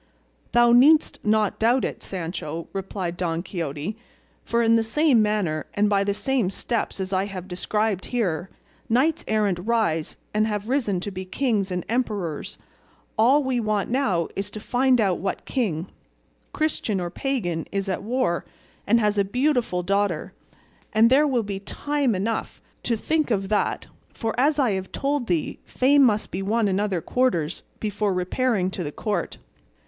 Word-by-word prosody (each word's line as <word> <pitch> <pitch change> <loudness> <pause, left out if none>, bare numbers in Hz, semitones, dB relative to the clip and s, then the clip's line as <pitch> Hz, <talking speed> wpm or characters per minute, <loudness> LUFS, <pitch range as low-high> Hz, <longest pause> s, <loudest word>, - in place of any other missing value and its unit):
"Thou 240 0 +6
needst 290 +6 +5
not 215 -1 +1
doubt 240 +4 +3
it, - - -5
Sancho," 165 -3 -5
replied 190 -2 -4
Don 170 -1 -1
Quixote, 165 +1 -4 0.5
"for 235 0 +1
in 230 0 +5
the 225 - +4
same 255 +1 +3
manner, 205 -8 0
and 205 +1 +2
by 200 -1 +3
the 200 0 -1
same 230 -1 0
steps 225 +2 -2
as 190 0 -3
I 190 +1 +1
have 190 -2 -7
described 200 +2 -1
here, 190 -7 -1 0.4
knights 270 +8 +2
errant 210 -5 +1
rise 185 -6 0 0.2
and 215 +1 +2
have 210 -1 -3
risen 225 -9 0
to 205 - -4
be 185 0 -5
kings 205 0 0
and 180 -1 -2
emperors; 205 - -2 0.6
all 260 +7 +4
we 260 -2 0
want 215 -1 -1
now 200 - +1
is 200 +1 -2
to 215 - -8
find 250 +3 +2
out 195 -5 +2
what 195 - -3
king, 185 - -1 0.7
Christian 300 -10 -1
or 175 -1 -3
pagan, 180 - -2
is 195 0 -2
at 185 -1 -2
war 225 -5 0 0.4
and 230 +3 +5
has 210 -2 +1
a - - +4
beautiful 245 -4 0
daughter; 195 -2 0 0.6
but 225 +1 +6
there 285 +4 +5
will 250 -5 +1
be 200 -1 -4
time 280 +4 -1
enough 215 +4 -2 0.2
to 230 - 0
think 310 +5 0
of 195 -4 0
that, 210 - 0 0.3
for, 225 -2 -3
as 290 +3 +3
I 260 -6 +3
have 190 -1 -3
told 280 -3 -1
thee, 170 -4 -1
fame 280 +3 +3
must 215 -5 +3
be 185 - -3
won 215 +3 +1
in 190 0 +1
other 200 -5 0
quarters 180 -9 0 0.2
before 205 -2 -1
repairing 190 +1 0
to 185 - -4
the 145 - -4
court. 205 +1 -3
210 Hz, 170 wpm, -24 LUFS, 185-240 Hz, 0.7 s, Thou